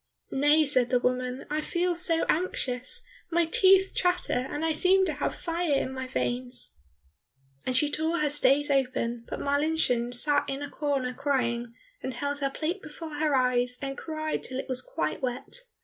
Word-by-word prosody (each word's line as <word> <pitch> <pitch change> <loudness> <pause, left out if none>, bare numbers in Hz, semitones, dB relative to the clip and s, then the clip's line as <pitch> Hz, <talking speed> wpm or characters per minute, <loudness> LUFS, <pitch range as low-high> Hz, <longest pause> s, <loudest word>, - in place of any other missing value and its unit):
"Nay," 295 +3 +4
said 255 -4 +3
the 250 - +3
woman, 250 +1 -1
"I 305 +1 0
feel 350 +3 0
so 335 -1 +3
anxious, 315 - 0 0.2
my 340 0 +2
teeth 380 +3 +4
chatter, 360 -8 0
and 300 +2 -2
I 325 - +2
seem 375 +4 +4
to 325 - 0
have 290 - -2
fire 335 -2 -1
in 265 -1 -1
my 260 0 -5
veins." 245 - -1 0.9
And 255 0 +2
she 295 - +4
tore 320 +3 -1
her 300 -2 +1
stays 290 0 +3
open, 250 -3 0
but - - -4
Marlinchen 285 -4 +1
sat 290 +4 +2
in 275 +1 -3
a 285 - -7
corner 275 -4 -1
crying, 240 -4 -1 0.3
and 260 - -4
held 285 +2 -2
her 275 -1 0
plate 330 +7 -3
before 310 +1 -8
her 300 -2 +1
eyes 250 -1 +2
and 275 0 -4
cried 310 0 -3
till 260 - -5
it 270 - -4
was 255 -1 -3
quite 155 -10 -3
wet. 270 - -4
285 Hz, 180 wpm, -27 LUFS, 255-315 Hz, 0.9 s, Nay